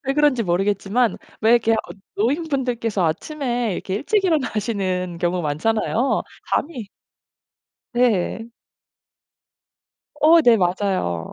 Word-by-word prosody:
왜 270 - 0
그런지 295 -5 +3
모르겠지만 200 +5 0 0.2
왜 220 - +3
이렇게 230 -1 +3
어 - - +3 0.4
노인분들께서 245 - -1
아침에 245 - -2
이렇게 185 +1 -4
일찍 390 - 0
일어나시는 200 - -1
경우 175 +1 0
많잖아요. 220 - 0 0.3
잠이 255 -10 -3 1.0
네. 230 -2 +1 1.7
어, 330 +2 +7
네. 240 -4 +6
맞아요. 180 - -1
225 Hz, 250 characters per minute, -21 LUFS, 185-255 Hz, 1.7 s, 어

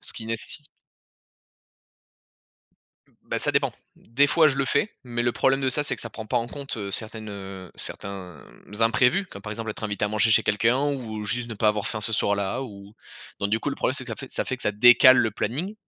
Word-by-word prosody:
ce - - -6
qui 110 - -8
nécessi 115 +6 -5 2.6
Bah, - - -2
ça - - 0
dépend. - - +1 0.2
Des 135 +5 +1
fois, 155 +1 +4
je 140 - -2
le 140 - +1
fais, 200 +10 +1
mais 120 -1 -2
le 120 - +1
problème 135 +3 +2
de 135 - +1
ça, 130 +3 +1
c'est 140 -3 -1
que - - -10
ça 115 - -6
prend 110 -1 -8
pas - - +1
en 115 - -3
compte, 140 0 -6
heu, 100 -3 -4
certaines, 110 +1 +1
heu, 95 -3 -8
certains, 90 -7 -3 0.4
imprévus. 125 +11 +3
Comme - - -12
par 105 - -7
exemple, 110 +1 -5
être 105 - -7
invité 105 0 -2
à - - 0
manger 110 +2 +2
chez 105 - +5
quelqu'un 115 +5 +2
ou 115 -7 -4
juste 120 +3 -2
ne 115 - -6
pas 110 +1 +2
avoir 105 -1 -1
faim 110 - -4
ce 110 +1 +5
soir-là 100 +5 0
ou 100 -4 -11 0.5
donc 100 - -1
du 110 - +2
coup - - -2
le - - -3
problème, 130 - 0
c'est 130 - -3
que 120 - -10
ça 115 - -4
fait 135 - -9
ça - - -1
fait 130 - -3
que - - -9
ça 105 - 0
décale 125 +4 +7
le 110 - +2
planning. 145 - -3
115 Hz, 235 wpm, -25 LUFS, 105-130 Hz, 2.6 s, décale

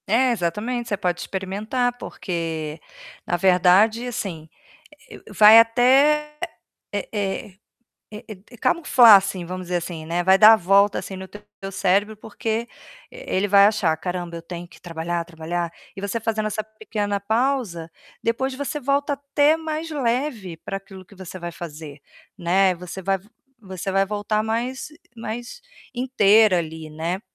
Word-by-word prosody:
É, 250 +5 +3
exatamente, 230 +5 -2
você 205 - -1
pode 180 -2 -2
experimentar, 215 +6 -2
porque 165 -7 -5 0.5
na 175 - -1
verdade, 190 +6 +4
assim, 175 -9 -5 0.6
eh, - - -10
eu - - -12
vai 215 +2 +9
até 275 +6 +3 0.6
eh 205 - -3
eh 205 +2 -3 0.6
eh 210 0 -10 0.3
eh 245 - -13
camuflar, 255 -5 +6
assim, 195 -2 -1
vamos 185 +1 -6
dizer 180 - 0
assim, 165 -2 -7
né, 175 +2 -1
vai 190 +1 +6
dar 215 +2 +9
a - - +3
volta 200 +1 +3
assim 190 - -6
no 190 0 -8
teu 205 +2 -12 0.3
cérebro, 200 +3 +1
porque 225 +2 -4 0.4
e - - -11
ele 190 +2 +1
vai 200 0 +7
achar: 195 -7 +1
"Caramba, 175 -1 -5
eu 165 - -8
tenho 175 +1 -8
que - - -18
trabalhar, 170 0 -4
trabalhar". 170 0 -4 0.2
E - - -6
você 200 +3 -2
fazendo 220 -1 -1
essa 215 0 -4
pequena 215 -1 -4
pausa, 220 -6 -1 0.3
depois 260 +4 -1
você 285 +2 -4
volta 280 +2 0
até 285 +2 +2
mais 320 0 -4
leve 245 - -2
para 195 - -5
aquilo 195 -1 -13
que 195 - -18
você 185 0 -9
vai 175 -1 -6
fazer, 155 -4 -9 0.4
né, 185 +2 +2
você 180 +2 -8
vai 195 +1 0
v 195 +3 -23 0.3
você 190 -2 -6
vai 195 0 +3
voltar 210 +1 -1
mais 235 +5 -3 0.3
mais 240 - -7 0.3
inteira 220 -6 +4
ali, 160 -1 -6
né? 165 +4 -3
200 Hz, 160 wpm, -22 LUFS, 180-230 Hz, 0.6 s, vai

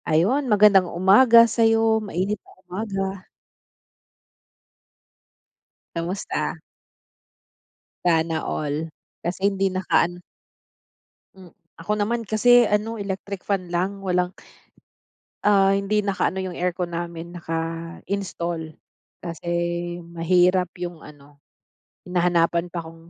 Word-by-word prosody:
Ayun, 235 - +2
magandang 205 -4 +5
umaga 230 +7 +6
sa'yo, 225 -1 +3
mainit 200 0 -2
na - - -21
umaga. 195 0 -4 2.7
Kamusta? 175 +4 -3 1.5
Sana 165 -2 +2
all, 150 +2 -3 0.3
kasi 180 +3 -2
hindi 195 -1 +2
nakaan 175 -1 0 1.1
Hmm, 185 -3 -15 0.2
ako 165 +5 -4
naman 225 +2 -1
kasi 240 +2 +5
ano 210 +2 -1
electric 195 -1 -5
fan 185 -3 -1
lang 190 +3 -2
walang 180 -1 0 1.1
ah, 195 -1 +4
hindi 200 +1 0
nakaano 195 -1 0
yung 190 -1 -3
aircon 180 0 -2
namin 170 0 -5
naka-install 165 0 -4 0.5
kasi 170 0 -6 0.6
mahirap 180 +2 +2
yung 175 -2 -6
ano, 145 -1 -16 0.6
hinahanapan 175 -1 +1
pa 170 -2 -4
kung 165 +1 -14
180 Hz, 95 wpm, -23 LUFS, 170-200 Hz, 2.7 s, umaga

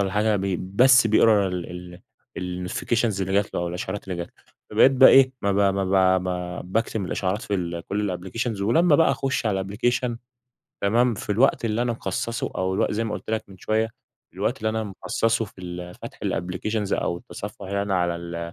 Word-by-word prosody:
والَّا 95 -1 0
حاجة 105 0 +2 0.2
بس 120 +6 +5
بيقرا 110 -2 +4
ال 90 -1 -4 0.7
ال 90 0 -4
الNotifications 110 +1 0
اللي 95 0 -2
جات 100 +1 +1
له - - 0
أو 85 - -2
الإشعارات 95 +3 -5
اللي 90 - -3
جات 85 0 -4
له. - - -28 0.3
فبقيت 135 - +5
بقى 130 0 +8
إيه، 135 -1 +6
ما 100 -1 +2
ب 100 0 +3
ما 95 -1 +3
ب - - -6
ب 90 0 -5
باكتم 110 -2 0
الإشعارات 95 +3 -2
في 85 -4 -3
كل 100 -3 -1
الApplications 115 -1 -2
ولما 145 - +4
بقى 165 - +4
أخش 135 -2 -1
على 95 -3 0
الApplication، 120 +4 -1 0.7
تمام، 115 +4 +3
في 105 - -7
الوقت 120 +3 +3
اللي 115 +1 0
أنا 120 -1 0
مخصصه 115 +2 -3
أو 95 0 0
الوق - - +1
زي 115 +2 -1
ما 110 - -3
قلت - - -7
لك 110 0 -1
من 95 -1 -14
شوية، 110 +2 0 0.4
الوقت - - -1
اللي 110 - -1
أنا 110 0 -1
مخصصه 115 +3 -1
في 100 -3 -14
ال 90 0 -7
فتح - - -10
الApplications 100 +4 -2
أو 85 - -1
التصفح 100 +2 -8
يعني 100 +1 -1
أنا 100 -1 -1
على 85 -1 0
ال 85 0 -6
100 Hz, 200 wpm, -24 LUFS, 90-115 Hz, 0.7 s, بقى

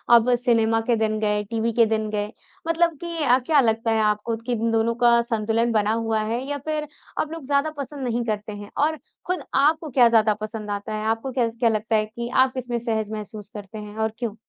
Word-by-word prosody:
अब 235 +2 +5
सिनेमा 225 -2 +2
के 235 - +5
दिन 215 -1 0
गए, 210 -1 0
टीवी 230 +2 -1
के 230 - +8
दिन 220 -1 -1
गए? 210 0 -2 0.4
मतलब 330 -1 +2
कि 340 -1 -4
अ, 250 -1 +5
क्या 305 -3 +4
लगता 225 -1 +1
है 220 0 +2
आपको 210 +2 0
कि 250 - -2
इन 230 0 0
दोनों 225 +1 +1
का 235 0 +6
संतुलन 230 0 0
बना 215 0 +2
हुआ 225 -1 0
है, 230 +3 -2
या 290 - -1
फिर 305 -1 -2 0.3
अब 310 - -4
लोग 325 -3 -6
ज़्यादा 280 +2 +1
पसंद 280 0 -6
नहीं 240 0 0
करते 215 -1 -3
हैं? 205 0 -9
और 310 +2 +2 0.3
खुद 365 0 -2
आपको 310 +3 +3
क्या 245 -3 +5
ज़्यादा 220 -2 +4
पसंद 215 -1 -5
आता 205 +1 -4
है? 215 0 -3
आपको 225 +4 -1
क्या 245 -2 +1
ज़ 230 0 -8
क्या 235 - +4
लगता 220 +1 0
है 215 - +2
कि 235 +2 -6
आप 260 - -2
किसमें 245 -2 -3
सहज 220 -2 -2
महसूस 210 -1 -7
करते 210 0 -8
हैं 210 0 -8
और 220 0 0
क्यों? 225 -4 -3
225 Hz, 230 wpm, -23 LUFS, 215-250 Hz, 0.4 s, के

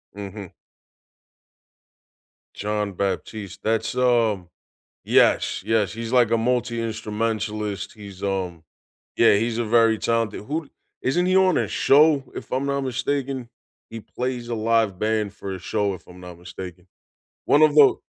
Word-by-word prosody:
Mhm. 100 -1 -7 2.1
Jon 105 -1 -2
Batiste, 100 +1 -4
that's, 115 +2 0
um 115 -8 +2 0.6
Yes, - - +3
yes, 110 -2 +1
he's 115 +1 -5
like 120 -3 +4
a 115 - +4
multi-instrumentalist, 110 -3 -2
he's, 100 -3 -11
um 90 -4 -2 0.5
Yeah, 115 -3 +6
he's 115 +2 0
a 115 - 0
very 115 0 +4
talented 115 -2 -1
who 155 +2 -3
d - - -23 0.3
Isn't 175 +7 +1
he 185 - +2
on 185 -3 +4
a - - 0
show, 145 0 +4
if - - -8
I'm 130 +2 0
not 140 0 -1
mistaken? 130 -1 -2 0.4
He 115 0 -7
plays 125 0 -4
a 120 - -1
live 110 -3 +1
band 110 -2 0
for 100 -2 -6
a - - -8
show, 100 +1 -1
if - - -16
I'm 90 0 -13
not 90 -1 -10
mistaken. 90 0 -9 0.6
One 150 - +4
of 155 -1 +6
the 145 -2 +7
110 Hz, 145 wpm, -23 LUFS, 100-125 Hz, 2.1 s, the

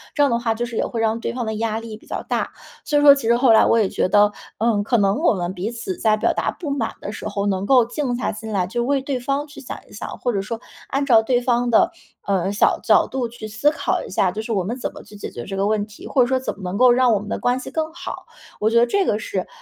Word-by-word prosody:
这 290 - +2
样 280 - +4
的 235 - +1
话 235 -1 0
就 235 +2 -3
是 235 -2 -6
也 - - +1
会 230 - -3
让 225 0 +1
对 - - -3
方 245 -1 -3
的 220 - -2
压 220 0 -1
力 225 -2 -8
比 - - -21
较 - - -4
大。 - - -2 0.3
所 295 - +1
以 - - +4
说 290 -1 +9
其 275 -5 -4
实 235 - +5
后 250 -1 +4
来 220 - +6
我 - - +4
也 205 -3 +2
觉 - - 0
得， 205 +2 +4 0.3
嗯， 220 -2 +2
可 235 +3 +1
能 195 +2 +2
我 330 - +3
们 180 -2 -3
彼 190 +3 -3
此 245 +11 -5
在 215 -2 +3
表 215 - +1
达 - - -1
不 320 - -7
满 245 -6 -2
的 205 - -5
时 215 - -6
候 205 -1 -2
能 190 0 -1
够 255 +1 +5
静 250 0 -2
下 240 - -1
心 220 +1 -7
来 185 -3 +1
去 240 +6 -3
为 270 +3 +1
对 270 -1 -2
方 275 +4 -1
去 290 - -12
想 255 - -7
一 - - -20
想， 210 - -6
或 245 - 0
者 200 -4 -1
说 225 +3 -5 0.3
按 275 +1 0
照 235 -5 +6
对 245 +1 +1
方 245 0 +1
的 225 - +4 0.4
呃 195 -1 +1
小 205 - +2
角 - - +4
度 260 -2 -2
去 230 -2 -9
思 220 +8 +1
考 285 -3 -1
一 - - -9
下。 185 -1 +2
就 215 - -4
是 230 - -5
我 195 -3 0
们 230 +7 -4
怎 - - -3
么 - - -10
去 210 - -15
解 205 - -6
决 120 - -7
这 195 - -5
个 195 - +1
问 210 -1 +1
题， 210 - -13
或 265 - +2
者 245 - +4
说 260 +1 +1
怎 260 - -3
么 195 - -14
能 180 +2 -3
够 255 +1 +6
让 250 0 +4
我 210 - +2
们 205 - -9
的 - - -2
关 245 +1 +1
系 - - -7
更 315 -1 -2
好。 345 - -7 0.3
我 215 - +2
觉 230 - +2
得 235 - +6
这 390 +10 +1
个 210 - +1
是 190 -3 -3
230 Hz, 330 characters per minute, -21 LUFS, 210-255 Hz, 0.4 s, 说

